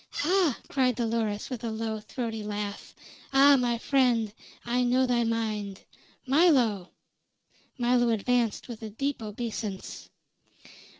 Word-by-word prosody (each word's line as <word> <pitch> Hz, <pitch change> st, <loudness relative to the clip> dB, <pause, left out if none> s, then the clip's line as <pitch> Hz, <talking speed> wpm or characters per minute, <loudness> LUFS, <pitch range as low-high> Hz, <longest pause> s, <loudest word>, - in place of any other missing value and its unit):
"Hah!" 345 Hz, -4 st, +1 dB
cried 255 Hz, -3 st, +1 dB
Dolores, 225 Hz, -2 st, -2 dB
with 245 Hz, -2 st, -5 dB
a 230 Hz, -, -2 dB
low, 220 Hz, 0 st, -3 dB
throaty 225 Hz, 0 st, -5 dB
laugh. 205 Hz, -1 st, -5 dB, 0.4 s
"Ah! 275 Hz, +1 st, +7 dB
my 245 Hz, -2 st, +1 dB
friend, 240 Hz, -4 st, +1 dB, 0.3 s
I 245 Hz, +1 st, +1 dB
know 250 Hz, +1 st, +3 dB
thy 245 Hz, -2 st, +1 dB
mind. 215 Hz, -4 st, -2 dB, 0.4 s
Milo!" 255 Hz, -, +3 dB, 0.9 s
Milo 240 Hz, -1 st, +2 dB
advanced 230 Hz, +1 st, 0 dB
with 235 Hz, -3 st, -8 dB
a 220 Hz, -, -6 dB
deep 275 Hz, +5 st, -3 dB
obeisance. 215 Hz, -2 st, -5 dB
235 Hz, 120 wpm, -28 LUFS, 220-255 Hz, 0.9 s, Ah